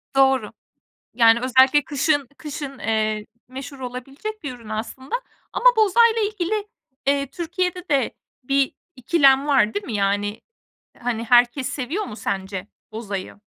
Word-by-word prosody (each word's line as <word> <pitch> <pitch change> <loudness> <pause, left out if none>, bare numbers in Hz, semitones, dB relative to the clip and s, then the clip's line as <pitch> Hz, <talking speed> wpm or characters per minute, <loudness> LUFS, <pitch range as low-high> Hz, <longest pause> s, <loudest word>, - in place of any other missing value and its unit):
Doğru. 265 -5 +3 0.6
Yani, 230 0 +5
özellikle 260 +3 +4
kışın 290 -2 +1
kışın, 285 -3 -7
eee, 215 -1 0 0.2
meşhur 265 +2 -8
olabilecek 270 - -7
bir 270 -4 -5
ürün 230 -3 -13
aslında 235 - -4 0.4
ama - - -3
bozayla 450 +2 +4
ilgili, 420 0 -1 0.4
eee, 280 0 +2
Türkiye'de 360 +4 -3
de 275 -4 +1 0.3
bir 275 +1 +1 0.2
ikilem 275 +1 +4
var, 255 -7 +3
değil 205 - -3
mi, 235 - -5
yani? 205 +1 0 0.6
Hani, 235 -2 -2
herkes 245 +3 +4
seviyor 300 - -3
mu 215 - -8
sence 195 -2 -4 0.2
bozayı? 205 -3 -6
265 Hz, 130 wpm, -22 LUFS, 225-295 Hz, 0.6 s, Yani